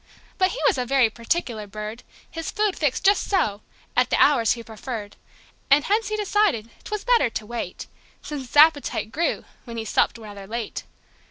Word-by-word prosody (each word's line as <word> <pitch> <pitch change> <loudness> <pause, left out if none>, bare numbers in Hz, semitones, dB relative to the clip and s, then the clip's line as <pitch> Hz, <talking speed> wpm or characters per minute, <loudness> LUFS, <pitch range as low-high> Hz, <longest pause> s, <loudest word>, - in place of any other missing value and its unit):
But 370 0 +4
he - - -5
was 445 - +3
a 250 - -1
very 260 -4 +3
particular 230 -2 -2
bird: 215 +3 -7 0.3
His 330 0 -5
food 420 -2 0
fixed 295 +1 -1
"just 400 +1 +3
so," 215 - +1 0.3
at - - +3
the - - +1
hours 245 -6 +5
he 235 -1 -8
preferred. 220 -2 -7 0.5
And 285 +1 +6
hence 430 +5 +1
he 430 - -2
decided 400 - +1
'twas 425 -1 -4
better 485 - +3
to 220 - -5
wait, 230 -5 -5 0.4
Since 285 -4 -6
his 265 - -5
appetite 290 -7 +4
grew 330 +6 -1 0.2
when 235 -2 -7
he 225 - -3
supped 220 - +1
rather 205 -3 -10
late. 230 0 -5
250 Hz, 180 wpm, -24 LUFS, 220-365 Hz, 0.5 s, And